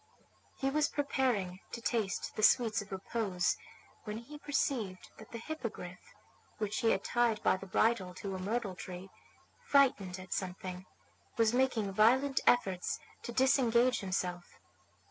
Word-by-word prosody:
He 270 0 0
was 300 +1 +2
preparing 250 -10 0
to - - -4
taste 225 -5 -1
the - - -2
sweets 225 0 +4
of 200 - -12
repose 190 -2 0 0.5
when 210 0 -5
he 290 +6 -10
perceived 255 -10 -1
that 220 - -12
the 230 - -5
Hippogriff, 230 - -7 0.4
which 210 0 -2
he 230 - +3
had 195 - +1
tied 240 -3 +1
by - - +4
the 195 +1 -8
bridle 190 -2 +1
to 195 +1 -5
a - - -4
myrtle 205 +1 -2
tree, 180 +1 -8 0.5
frightened 230 -10 +3
at 185 0 -6
something, 185 0 -5 0.5
was 225 0 +3
making 245 -6 +1
violent 260 +7 +4
efforts 190 -7 +2 0.2
to - - -6
disengage 250 0 +3
himself. 180 -3 -3
215 Hz, 145 wpm, -33 LUFS, 190-245 Hz, 0.5 s, sweets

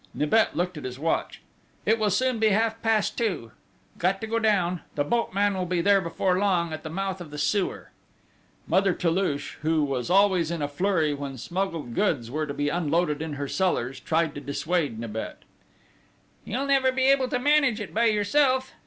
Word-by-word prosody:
Nibet 185 +10 +2
looked 180 -1 -1
at - - -11
his 130 -1 -6
watch: 160 +3 -2 0.4
"It 220 +2 +3
will 215 -1 +2
soon 250 +4 +1
be 220 - +4
half 225 +2 +1
past 225 -2 +1
two! 190 - -2 0.5
Got 190 +3 +1
to - - -2
go 230 +1 -1
down! 185 -6 +1
The 145 - +1
boatman 205 +2 +1
will 185 -1 -2
be 180 0 0
there 200 +3 +4
before 180 +2 0
long, 175 -5 +1
at 155 - -5
the 155 - -7
mouth 190 +2 -3
of 170 - -8
the 150 - -8
sewer!" 190 +6 -1 0.7
Mother 190 +1 +2
Toulouche, 165 -4 -1
who 155 0 +1
was 135 -1 -2
always 185 -3 +3
in 170 -3 -3
a - - 0
flurry 160 0 0
when 140 -2 -6
smuggled 170 -4 -3
goods 140 - 0
were 155 +2 -2
to 140 - -4
be 145 - -1
unloaded 155 -1 0
in 160 -2 -4
her 140 0 -4
cellars, 135 -8 -1
tried 160 -1 0
to 145 - -7
dissuade 145 -2 -1
Nibet: 110 -1 -6 1.0
"You'll 260 +6 -2
never 270 -2 +3
be 260 0 -1
able 270 -1 +4
to 250 - -1
manage 280 -3 +3
it 210 - -7
by 230 +2 +2
yourself!" 255 +5 +2
180 Hz, 190 wpm, -26 LUFS, 150-215 Hz, 1.0 s, be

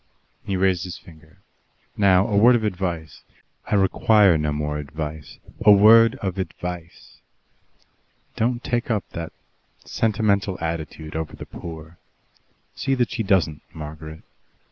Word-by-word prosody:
He 95 - -2
raised 95 -2 +1
his 90 -2 -7
finger. 80 0 -18 0.6
"Now, 95 -2 +4
a 105 - -1
word 120 +5 +6
of 115 - 0
advice." 90 -6 -4 0.5
"I - - 0
require 100 0 +4
no 75 -1 -1
more 75 0 -3
advice." 75 0 -7 0.3
"A 105 - +8
word 115 +4 +7
of 95 -1 -3
advice. 90 -2 -7 1.2
Don't 120 +2 -1
take 120 0 -2
up 110 -3 -1
that 85 -1 -6 0.5
sentimental 100 -4 0
attitude 80 -1 -5
over 80 -1 -4
the - - -9
poor. 80 0 -10 0.7
See 135 -1 -1
that 120 -2 0
she - - -2
doesn't, 95 -7 +1
Margaret. 80 0 -9
90 Hz, 130 wpm, -23 LUFS, 80-105 Hz, 1.2 s, A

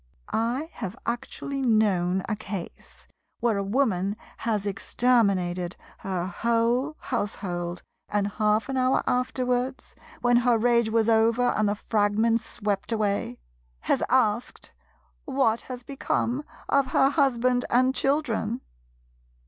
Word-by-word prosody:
I 250 +8 -1
have 195 +6 -6
actually 270 +3 -3
known 195 -6 +2
a 215 - -1
case 200 -4 -8 0.3
where 230 -3 +1
a 200 - -1
Woman 200 -3 0 0.2
has 215 -3 -1
exterminated 195 -5 +1 0.2
her 185 -2 -2
whole 235 +8 0
household, 180 -6 -3 0.3
and 205 -1 +1
half 210 +1 +1
an 270 -1 -2
hour 255 +1 +2
afterwards, 250 +1 -1 0.3
when 245 0 +4
her 240 -1 +3
rage 235 0 +3
was 225 0 +2
over 230 +2 +3
and 210 -1 +1
the 205 - 0
fragments 220 +2 +1
swept 205 -1 -3
away, 205 - -1 0.4
has - - +1
asked 235 -2 0 0.5
what 260 -5 +1
has 250 -1 -6
become 275 0 -2 0.2
of 275 -1 +3
her 270 - +3
husband 255 -4 +2
and 255 +2 +3
children. 265 -5 0
230 Hz, 120 wpm, -26 LUFS, 205-250 Hz, 0.5 s, when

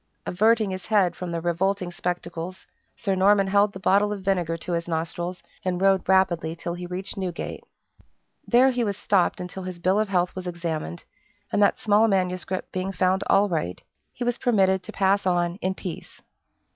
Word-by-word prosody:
Averting 215 +2 +2
his 185 0 -6
head 195 -5 +3
from 180 -1 -5
the 170 -1 -2
revolting 180 +2 0
spectacles, 175 0 -4 0.3
Sir 200 -3 -1
Norman 195 +1 +4
held 200 +1 +3
the 190 - -9
bottle 200 +2 +3
of 200 -2 -5
vinegar 175 -4 0
to 175 - -7
his 170 0 -1
nostrils, 170 +2 -3 0.2
and 180 -1 -1
rode 195 -1 +2
rapidly 175 -4 +2
till 170 0 -4
he 175 0 -6
reached 185 +3 -5
Newgate. 185 -3 -4 0.8
There 255 +2 +5
he 245 -1 0
was 200 -3 -2
stopped 195 -3 +1
until 180 +1 -6
his 185 -1 -6
bill 185 +4 +2
of 215 -2 0
health 180 -2 +1
was 185 -1 -5
examined, 165 - -4 0.5
and - - +1
that 200 - +4
small 215 +1 +3
manuscript 185 -2 -1
being 185 +1 -2
found 185 +1 +1
all 200 +1 +4
right, 155 - -2 0.3
he 245 - -5
was 245 0 -1
permitted 190 -6 +3
to - - -8
pass 195 0 +2
on 175 0 +1
in 190 -1 -2
peace. 180 -4 -8
185 Hz, 185 wpm, -25 LUFS, 175-200 Hz, 0.8 s, There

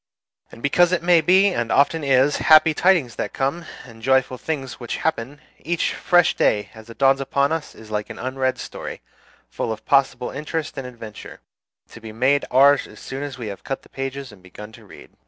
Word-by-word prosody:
And 115 - -14
because 175 +5 +3
it 175 -2 0
may 175 -1 +5
be, 190 +5 +4
and 120 -5 -2
often 150 +3 +2
is, 135 +1 +3
happy 155 0 +5
tidings 160 - +2
that - - -4
come, 140 +6 -2 0.2
and 115 -2 -14
joyful 130 0 +1
things 135 -5 -5
which 120 -2 -5
happen, 145 -2 -3 0.2
each 170 +1 -1
fresh 175 -2 +3
day 105 -1 +1
as 110 +1 -14
it 115 - -12
dawns 135 0 +3
upon 140 +1 0
us 160 -1 -4
is 110 -1 -14
like 105 0 -3
an - - -8
unread 130 +1 -2
story, - - -8 0.5
full - - -4
of 110 -1 -7
possible 135 -2 +1
interest 150 +2 -4
and 135 -2 -6
adventure, 115 -4 -11 0.5
to 115 - -13
be 110 -1 -9
made 130 +6 +1
ours 140 +2 +4
as - - -15
soon 135 +1 -7
as 145 -2 -6
we 120 - -6
have 100 - -9
cut 135 - -5
the - - -20
pages 135 -1 -6
and 105 -3 -17
begun 105 +4 -12
to - - -16
read. - - -14
135 Hz, 205 wpm, -22 LUFS, 120-150 Hz, 0.5 s, may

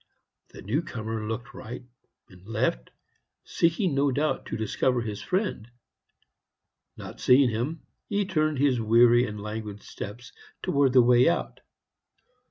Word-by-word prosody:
The - - -12
new 120 - 0
comer 110 -7 -5
looked 120 +3 -5
right 125 +3 -8 0.4
and 90 -1 -18
left, 105 - -1 0.5
seeking 170 +1 +1
no 140 +1 +2
doubt 150 +4 -1
to - - -4
discover 120 +3 0
his 105 -3 -5
friend; 185 - -2 1.3
not - - -9
seeing 130 -1 +5
him, 125 +9 -3 0.3
he 205 -1 0
turned 155 -5 0
his 130 -3 +2
weary 120 +2 +5
and 105 0 -7
languid 105 -1 -6
steps 120 +4 -8 0.3
towards 140 -3 +2
the 125 - +8
way 125 +3 +5
out. 170 - -2
120 Hz, 135 wpm, -26 LUFS, 110-145 Hz, 1.3 s, the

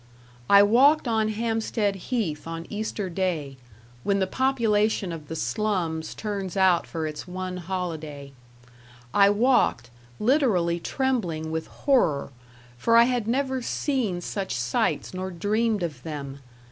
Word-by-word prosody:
I 200 0 +8
walked 265 +8 +5
on 220 -2 +1
Hampstead 220 -2 -1
Heath 185 - -3
on 165 0 -5
Easter 210 -1 -3
day, 165 -7 -2 0.5
when 200 -1 +1
the 190 - +2
population 220 -5 +1
of 155 -3 -7
the 160 - -5
slums 170 -4 -2
turns 200 -4 -4
out 185 -3 +3
for 160 -2 -3
its 155 +2 -6
one 185 0 -5
holiday; 160 -6 -5 0.8
I 200 0 +6
walked, 205 - +2 0.3
literally 210 - +2
trembling 175 -11 -1
with 160 0 -3
horror, 165 - +1 0.5
for 230 - +4
I 235 - +9
had 245 -3 0
never 265 +1 0
seen 235 -8 -1
such 195 +2 -3
sights 125 +8 -1
nor 185 +1 -4
dreamed 210 +3 0
of 150 -7 -4
them. 140 -2 -6
190 Hz, 135 wpm, -25 LUFS, 165-225 Hz, 0.8 s, I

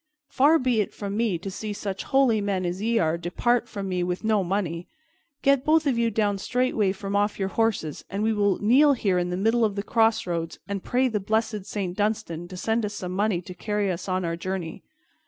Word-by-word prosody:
Far 295 +5 +5
be 250 -6 +1
it 205 - -3
from 200 -1 -4
me 220 -5 +1
to 190 +4 -6
see 210 +2 -5
such 195 -2 -5
holy 260 -6 +3
men 195 -2 -1
as 175 +2 -3
ye 230 +2 +1
are 165 -3 +1
depart 235 +8 0
from 200 -2 -5
me 180 -1 -1
with 180 +2 -2
no 215 -2 +2
money. 175 -2 -2 0.6
Get 275 -1 +4
both 315 +1 +3
of 275 -4 +2
you 230 0 +2
down 205 -2 0
straightway 235 -3 +1
from 195 +1 -4
off 205 +1 +1
your 195 -1 -1
horses, 210 -9 -1
and 200 +2 -2
we 220 0 +2
will 205 -2 +2
kneel 270 +7 +5
here 195 -8 +1
in 175 0 -1
the 180 - -2
middle 225 +4 +2
of 210 -3 +1
the 200 - -2
crossroads 185 -8 0
and 200 -2 -4
pray 255 +1 +2
the 220 -4 -1
blessed 215 0 -1
Saint 190 -4 -3
Dunstan 205 -5 -1
to 185 0 -9
send 225 +4 0
us 210 0 -3
some 180 -3 -5
money 195 -1 0
to 180 - -8
carry 205 +1 -1
us 180 +2 -5
on 185 -1 0
our 165 0 -1
journey." 175 -1 -5
205 Hz, 225 wpm, -25 LUFS, 185-225 Hz, 0.6 s, Far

